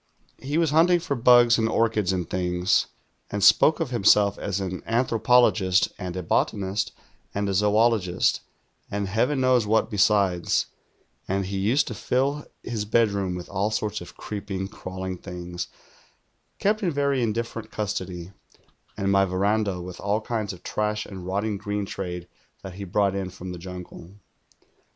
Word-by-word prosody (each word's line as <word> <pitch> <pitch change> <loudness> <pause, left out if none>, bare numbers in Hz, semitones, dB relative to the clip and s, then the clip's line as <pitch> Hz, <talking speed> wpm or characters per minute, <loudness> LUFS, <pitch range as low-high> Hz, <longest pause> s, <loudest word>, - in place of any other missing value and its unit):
He 145 +4 -2
was 165 -3 +2
hunt 165 +3 +5
ing 175 -1 +4
for 150 -4 -2
bugs 120 -1 +6
and 110 0 +1
orchids 110 -4 +1
and 90 -3 -2
things, 90 0 +1 0.4
and 100 -1 -2
spoke 105 +9 +6
of 160 -6 -2
liimself 105 -3 +4
as 100 -1 -2
an 95 -2 -4
anthropologist 115 -4 +3
and 90 -2 -5
a 90 - -3
botanist 100 +4 0 0.4
and 100 0 0
a 100 - -1
zoologist, 105 -2 +2 0.5
and 100 -1 -2
Heaven 125 +8 +1
knows 125 -4 +3
what 110 +2 +2
besides; 95 -3 +2 0.6
and 95 +1 -1
he 95 +1 -3
used 115 +9 +2
to - - -4
fill 135 +7 -1 0.2
his 115 -3 -3
bedroom 100 -4 +1
with 90 -1 -7
all 100 +2 -1
sorts 105 -2 -2
of 90 - -11
creeping, 100 -2 -5
crawling 95 -3 -6
things, 90 0 -6 0.9
kept 210 +2 +1
in 185 - +1
very 140 -3 +1
indifferent 115 0 -3
custody, 95 -5 -4 0.7
;ind 100 -1 0
my 100 0 +4
^'eranda 100 0 0
with 90 0 -8
all 100 +2 0
kinds 110 -2 -3
of 95 - -12
trash 105 0 -2
and 95 -3 -9
rotting 100 +2 -1
green 105 0 -3
trade 90 -3 -5 0.4
that 95 - -7
he 100 +2 -7
brought 100 +1 +1
in 95 -1 -3
from 90 0 -8
the 90 - -7
jimgle. 90 0 -9
100 Hz, 160 wpm, -25 LUFS, 95-115 Hz, 0.9 s, bugs